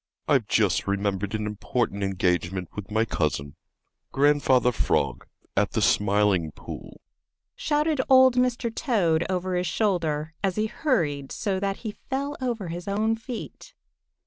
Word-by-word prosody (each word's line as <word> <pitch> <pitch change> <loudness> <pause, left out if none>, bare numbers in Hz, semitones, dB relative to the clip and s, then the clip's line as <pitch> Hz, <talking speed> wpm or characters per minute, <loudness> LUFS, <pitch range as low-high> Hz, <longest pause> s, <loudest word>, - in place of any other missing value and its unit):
"I've - - +3
just - - +2
remembered 100 +1 -1
an 105 -1 -2
important 105 0 -2
engagement 90 -2 0
with 105 -2 -6
my 110 +1 +1
cousin, 75 -7 -2 0.6
Grandfather 135 -3 +3
Frog, 70 - 0 0.3
at - - +1
the - - +1
Smiling 100 -5 +2
Pool," - - -9 0.6
shouted 300 -1 +1
old 260 -1 +7
Mr. 250 -2 +1
Toad 180 - +1
over 185 0 -1
his 180 0 0
shoulder, 160 -5 0
as 190 -2 +1
he 215 - +1
hurried 165 - -1
so 195 -3 -1
that 195 0 -1
he 215 - -1 0.2
fell 280 +2 -2
over 230 -8 -2
his 175 +2 -6
own 215 +3 +1
feet. 240 - -8
165 Hz, 140 wpm, -26 LUFS, -, 0.6 s, old